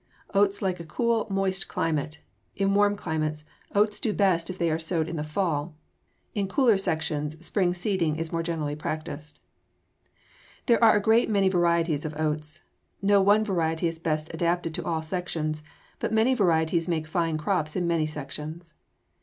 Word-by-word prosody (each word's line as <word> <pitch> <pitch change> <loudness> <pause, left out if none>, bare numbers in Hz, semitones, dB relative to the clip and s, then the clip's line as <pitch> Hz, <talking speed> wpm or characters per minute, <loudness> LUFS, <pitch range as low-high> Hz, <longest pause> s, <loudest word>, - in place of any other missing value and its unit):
Oats 200 0 +2
like 185 -2 0
a - - -6
cool, 230 +7 0
moist 195 -1 0
climate. 155 -1 -2 0.3
In 195 0 +1
warm 205 0 +4
climates, 155 -4 -2 0.3
oats 210 +1 +3
do 215 - 0
best 185 -5 +2
when 185 - -5
they 170 -2 +1
are 160 - 0
sowed 165 -1 0
in 170 - -4
the 150 - -2
fall. 155 -1 -2 0.6
In 200 -2 -1
cooler 240 +1 +4
sections, 155 -4 -2
spring 180 -2 +1
seeding 175 -4 0
is 160 0 -3
more 165 - 0
generally 160 -3 -2
practiced. 150 -1 -5 1.3
There 235 -1 +3
are 220 -1 +7
a - - +3
great 225 +3 +3
many 200 -3 +3
varieties 170 -4 +2
of 155 -1 -5
oats. 155 +1 -2 0.4
No 200 0 +4
one 205 +2 +4
variety 165 -4 0
is 165 -1 -2
best 155 -1 -2
adapted 170 0 0
to - - -3
all 160 -2 -1
sections, 160 -3 -3 0.4
but - - -2
many 220 +4 +3
varieties 170 -6 +2
make 160 -3 -1
fine 165 0 0
crops 155 -2 -1
in 180 - 0
many 165 -2 +1
sections. 155 +3 -7
170 Hz, 170 wpm, -26 LUFS, 155-195 Hz, 1.3 s, are